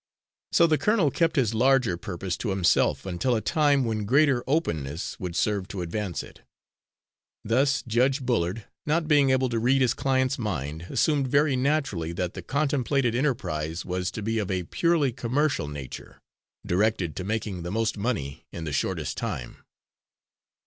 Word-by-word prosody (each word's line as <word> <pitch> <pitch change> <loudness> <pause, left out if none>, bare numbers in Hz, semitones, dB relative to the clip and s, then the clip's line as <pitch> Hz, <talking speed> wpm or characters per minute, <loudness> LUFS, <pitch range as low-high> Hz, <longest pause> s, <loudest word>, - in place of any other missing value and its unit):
So 170 - +5
the 155 -2 +2
colonel 205 -9 +2
kept 165 +4 +1
his 120 -7 +2
larger 125 -4 +3
purpose 90 +1 -4
to 115 - -3
himself 95 -1 +2
until 95 +7 0
a - - +1
time 140 +3 +2
when 110 -2 -2
greater 135 0 +3
openness 80 - -2
would 90 -2 -5
serve 100 -2 0
to 95 -4 -4
advance 85 -3 -3
it. - - -14 1.0
Thus 135 +5 +2
Judge 125 +4 +2
Bullard, 110 -3 0 0.2
not 160 +1 +1
being 145 -3 +4
able 130 0 +3
to 115 -1 -1
read 130 +4 +3
his 130 -2 +3
client's 130 -1 0
mind, 80 - -4
assumed 145 -4 +1
very 140 +1 +3
naturally 130 - 0
that 90 0 -3
the 95 - -6
contemplated 135 - 0
enterprise 90 - -1
was 90 0 -2
to 110 - -6
be 110 +1 0
of 100 - -3
a 95 -2 -1
purely 160 - +1
commercial 130 - 0
nature, 70 -3 -8 0.5
directed 95 -3 +1
to 90 - -3
making 105 -2 -3
the 85 - -5
most 110 +3 0
money 100 - -3
in 85 - -6
the 75 -2 -4
shortest - - -2
time. - - -4
115 Hz, 165 wpm, -26 LUFS, 90-135 Hz, 1.0 s, So